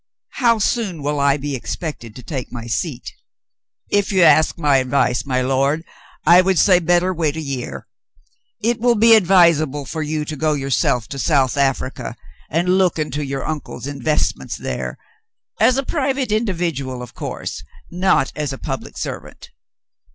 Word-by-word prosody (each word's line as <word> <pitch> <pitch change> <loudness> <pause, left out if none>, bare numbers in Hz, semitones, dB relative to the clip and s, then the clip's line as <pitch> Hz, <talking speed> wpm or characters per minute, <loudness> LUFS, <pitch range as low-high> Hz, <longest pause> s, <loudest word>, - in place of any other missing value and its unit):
How 235 -3 +4
soon 200 - -1
will 145 0 -1
I 140 0 +3
be 145 -1 -4
expected 130 -4 -6
to 125 - -10
take 130 -1 -5
my 120 -2 -7
seat 125 +3 -3
.^" - - -39 0.8
"If 205 0 +1
you 190 -3 +4
ask 155 0 +5
my 145 -4 +3
advice, 130 0 +1
my 130 -1 0
lord, 135 +4 +1 0.4
I 175 +3 +7
would 190 0 +1
say 185 -1 +5
better 175 +2 +2
wait 160 -3 -1
a - - -2
year. 130 - -5 0.8
It 235 +1 +1
will 240 +1 +3
be 225 +1 +6
advisable 170 -8 +4
for 160 +4 -4
you 155 0 -2
to 155 - -5
go 155 +1 0
yourself 135 -4 0
to 140 - -6
South 135 -5 +2
Africa 135 -2 -1 0.3
and 180 +5 +2
look 180 -3 +2
into 150 -1 -2
your 135 -1 -4
uncle's 145 -5 -5
investments 145 +1 -1
there - - -4 0.3
— - - -42
as 255 - +5
a 275 - 0
private 270 -5 -1
individual, 165 - -2
of 125 - -11
course, - - -6 0.3
not 180 -5 +2
as 150 -3 -2
a 135 - -5
public - - -6
servant. - - -7
155 Hz, 165 wpm, -20 LUFS, 135-185 Hz, 0.8 s, I